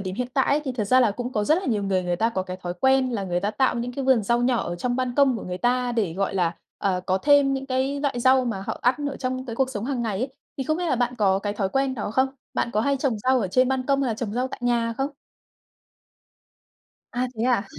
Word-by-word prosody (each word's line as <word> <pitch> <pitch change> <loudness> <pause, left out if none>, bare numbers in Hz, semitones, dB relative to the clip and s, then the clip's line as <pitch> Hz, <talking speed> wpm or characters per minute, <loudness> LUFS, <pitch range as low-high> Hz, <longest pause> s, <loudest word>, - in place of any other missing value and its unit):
điểm 185 -1 -4
hiện 245 +3 -3
tại 270 - +3
ấy, 285 +2 +2
thì 265 - -2
thật 230 -4 -2
ra 255 +5 +4
là 235 - +4
cũng 245 +4 -5
có 210 -3 0
rất 310 - +4
là 380 - -6
nhiều 215 -4 0
người 190 -2 0
người 175 -1 -1
ta 225 +5 +2
có 190 -5 -2
cái 185 0 -6
thói 175 -1 -5
quen 265 -1 +3
là 215 -5 -2
người 175 -1 -1
ta 200 +3 0
tạo 265 +4 +1
những 245 +1 -3
cái 275 +2 -4
vườn 260 -4 +4
rau 235 +4 +1
nhỏ 245 -1 +2
ở 175 - -3
trong 245 +6 -1
ban 255 -1 -1
công 275 -3 +4
của - - -6
người 180 0 -5
ta 245 +1 +1
để, 215 -8 0
gọi 195 +1 -1
là, 175 -3 0 0.2
ờ, 185 -2 0
có 185 +1 +2
thêm 285 +3 +4
những 270 0 -4
cái 270 +2 -1
loại 275 -4 -1
rau 260 +1 +4
mà 215 -6 -3
họ - - -3
ăn 245 +2 +4 0.2
ở 275 - -6
trong 255 0 -3
cái 230 -2 -5
cuộc 265 0 +1
sống 210 -3 -4
hằng 260 -2 -2
ngày 215 -4 -2
ấy, 255 +5 -1 0.3
thì 270 - -1
không 310 +4 0
biết 355 +1 -2
là 260 - +2
bạn 245 +1 0
có 195 -2 +3
cái 205 +1 -3
thói 200 -2 -1
quen 270 +4 0
đó 210 -4 -4
không? 260 +4 +2 0.3
Bạn - - 0
có 210 - +2
hay 280 +4 +1
trồng 260 -5 -1
rau 255 +4 +2
ở 195 - -1
trên 255 +7 +3
ban 260 -1 -1
công 275 0 +2
hay 260 - 0
là - - -1
trồng 215 -2 -4
rau 250 +3 -1
tại - - -8
nhà 235 -1 +1
không? 270 +2 0 2.0
À, 250 0 -1
thế 225 - -1
à? 240 -5 +2
245 Hz, 295 wpm, -24 LUFS, 205-260 Hz, 2.0 s, ra